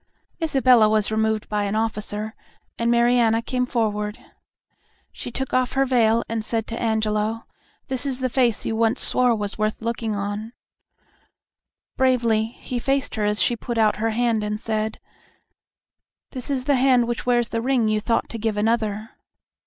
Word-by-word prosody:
Isabella 255 -8 +4
was 215 -1 +1
removed 220 0 0
by 210 -1 -1
an 200 +1 -2
officer, 215 -1 -2 0.5
and 230 0 +1
Mariana 235 -1 +3
came 250 +1 -1
forward. 210 -3 -1 0.9
She - - -7
took 265 +2 -4
off 255 0 +1
her 270 0 +2
veil, 235 -3 +3
and 225 -1 -3
said 225 0 -2
to 230 - -4
Angelo, 220 0 0 0.4
"This 260 -2 -2
is 265 -2 -2
the 260 - 0
face 245 -3 +1
you 225 - -1
once 225 +3 +1
swore 250 -2 +2
was 205 -1 -3
worth 215 +1 -1
looking 230 -2 -2
on." 205 +3 -4 1.4
Bravely 235 -4 +2
he 240 +2 -6
faced 270 +2 0
her 210 - -1
as 210 0 +2
she 240 - +1
put 235 +1 -5
out 215 -1 +3
her 225 +1 0
hand 225 -1 +1
and 210 0 -2
said, 220 0 -2 1.3
"This 255 -1 -6
is 265 -2 -1
the 280 0 +2
hand 250 -2 +4
which 240 +1 -4
wears 240 -2 +2
the 230 - -2
ring 250 -2 +1
you 215 0 +1
thought 230 +1 0
to 230 - -6
give 215 -1 -1
another." 215 0 0
225 Hz, 170 wpm, -23 LUFS, 215-245 Hz, 1.4 s, Isabella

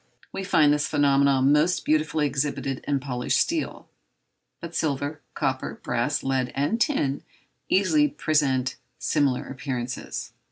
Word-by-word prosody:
We 195 - -4
find 155 -6 +4
this 150 0 0
phenomenon 140 -2 +3
most 155 +4 +2
beautifully 155 0 +1
exhibited 140 -1 -2
in 140 -1 +1
polished 125 -2 -1
steel; 325 -1 -1 0.7
but 170 0 -8
silver, 145 -1 -2
copper, - - -2
brass, - - -1
lead, 130 -2 0
and 145 +12 0
tin, 145 - +1 0.5
easily 165 -6 +4
present 135 -3 0 0.2
similar 140 -4 +1
appearances. 130 -3 -5
145 Hz, 120 wpm, -25 LUFS, 135-155 Hz, 0.7 s, find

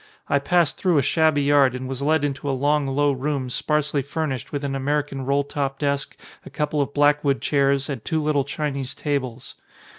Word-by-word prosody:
I 140 - +2
passed 170 +1 +1
through 180 -4 +2
a 140 - +3
shabby 155 0 +2
yard 140 -3 +4
and 130 0 -5
was 135 0 -5
led 155 +1 +2
into 140 0 -3
a 135 - 0
long 145 +1 +1
low 145 +2 +2
room 135 -1 -2
sparsely 150 +1 0
furnished 140 -3 -4
with 145 -1 -3
an 140 -1 -2
American 135 0 -2
roll 140 +1 +2
top 140 -1 -3
desk, 140 -1 -2 0.3
a - - -10
couple 150 0 -1
of 140 - -2
black 145 +1 +3
wood 140 -2 +1
chairs 140 -1 +1
and 135 -7 -5
two 160 - -1
little 150 -2 +1
Chinese 140 -2 -4
tables. 130 -5 -3
140 Hz, 200 wpm, -23 LUFS, 135-150 Hz, 0.3 s, yard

